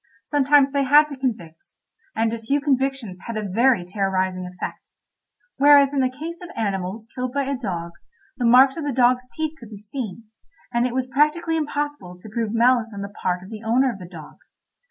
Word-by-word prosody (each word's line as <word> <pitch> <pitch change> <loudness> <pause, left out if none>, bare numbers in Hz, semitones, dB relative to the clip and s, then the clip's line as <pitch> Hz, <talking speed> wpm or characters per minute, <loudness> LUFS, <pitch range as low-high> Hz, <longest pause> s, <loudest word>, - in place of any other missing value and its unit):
Sometimes 285 -1 +3
they 280 0 +1
had 295 +3 +6
to 285 - -6
convict, 215 -12 -5 0.4
and 225 0 +1
a 230 - -4
few 275 +6 0
convictions 270 -8 -1
had 230 -2 -4
a 210 -1 -3
very 230 0 +2
terrorising 185 -1 -1
effect—whereas 280 - 0
in 280 - 0
the 260 -1 +2
case 320 +6 -7
of 355 - -9
animals 200 0 -3
killed 255 -1 -4
by 280 0 0
a 275 +1 -2
dog, 175 -9 -4 0.4
the 250 - -4
marks 260 +4 +6
of 325 - -4
the 290 -2 -2
dog's 250 0 +2
teeth 315 -1 -3
could 235 -4 -12
be 210 - -9
seen, 215 0 -7 0.5
and 235 +1 +2
it 250 - -6
was 260 -1 0
practically 305 +5 +1
impossible 290 - -3
to 215 - -12
prove 225 0 -2
malice 230 -1 +2
on 200 - -5
the 200 - -5
part 180 0 -1
of 190 - -12
the 215 -1 -7
owner 250 +4 +2
of 200 - -10
the 180 - -9
dog. 165 -4 -11
245 Hz, 195 wpm, -22 LUFS, 200-275 Hz, 0.5 s, had